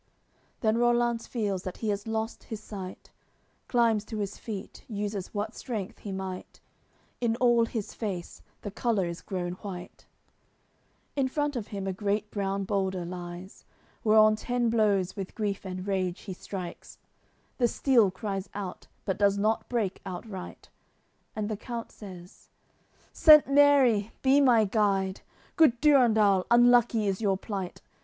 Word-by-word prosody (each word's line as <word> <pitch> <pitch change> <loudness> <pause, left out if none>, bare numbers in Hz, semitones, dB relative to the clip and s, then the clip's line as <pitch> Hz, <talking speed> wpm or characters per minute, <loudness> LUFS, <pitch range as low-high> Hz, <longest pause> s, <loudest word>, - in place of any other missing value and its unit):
CLXXI - - -40
Then 220 0 +2
Rollanz 240 -1 +2
feels 205 -6 -2
that 185 -1 -6
he 220 - -2
has 205 +1 -2
lost 225 +1 -3
his 220 - -6
sight, 195 -4 -9 0.6
Climbs 230 -4 +2
to 220 0 -6
his 205 -1 -3
feet, 205 -4 -7
uses 205 -3 -4
what 210 +2 -3
strength 220 -4 -5
he 205 - -7
might; 190 -1 -6 0.6
In 230 -2 +1
all 240 -1 +3
his 220 -4 -4
face 190 -6 -5 0.2
the 205 - -5
colour 215 -3 0
is 170 0 -5
grown 180 -2 -3
white. 185 -3 -8 1.1
In 275 -2 +1
front 290 +1 -1
of 230 -4 -4
him 200 -2 -5
a 190 - -1
great 205 +2 -2
brown 195 -1 -1
boulder 190 -2 -1
lies; 175 +1 -8 0.4
Whereon 215 0 +6
ten 245 0 0
blows 205 -5 +2
with 195 -2 -6
grief 205 -3 -2
and 185 0 -5
rage 185 -3 -1
he 195 - -6
strikes; 180 -1 -8 0.6
The 240 - +4
steel 235 -4 +3
cries 195 0 -4
out, 195 -3 -6 0.2
but 190 - -2
does 200 -1 +3
not 215 +2 0
break 220 -6 -1
outright; 190 0 -8 0.7
And 215 -1 -2
the 215 - -2
count 235 +1 -6
says: 185 -4 -12 0.6
"Saint 305 -2 +8
Mary, 275 -7 +4
be 275 +2 +5
my 240 -5 +5
guide 195 -2 +1 0.4
Good 300 -8 +5
Durendal, 220 -10 +4
unlucky 240 -2 +5
is 195 +1 -1
your 195 -3 +2
plight! 195 -3 -6
210 Hz, 150 wpm, -28 LUFS, 190-235 Hz, 1.1 s, Saint